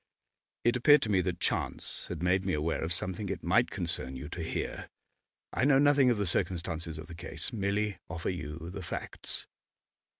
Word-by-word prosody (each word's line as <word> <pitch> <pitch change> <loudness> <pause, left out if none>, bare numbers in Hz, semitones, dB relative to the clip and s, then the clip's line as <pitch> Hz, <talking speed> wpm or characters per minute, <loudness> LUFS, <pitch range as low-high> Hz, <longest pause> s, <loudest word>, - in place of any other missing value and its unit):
It 120 +1 +3
appeared 145 +4 +6
to 110 - -2
me 95 -2 +4
that - - -2
chance - - -2
had - - -5
made 90 +1 +3
me 95 -1 0
aware 80 +2 0
of 80 - -2
something 95 +2 -3
it 95 - -4
might 105 +8 +3
concern 85 -8 0
you 65 +3 -6
to 85 - -5
hear. 80 - -3 0.6
I - - 0
know 140 0 +6
nothing 140 -2 +5
of 120 - +2
the 100 - 0
circumstances 85 -2 -1
of 80 - -7
the 85 - -10
case, 85 - -1
merely 100 -2 0
offer 85 +3 -2
you 80 0 -6
the 95 +1 -6
facts. 85 - -2
90 Hz, 190 wpm, -31 LUFS, 85-105 Hz, 0.6 s, appeared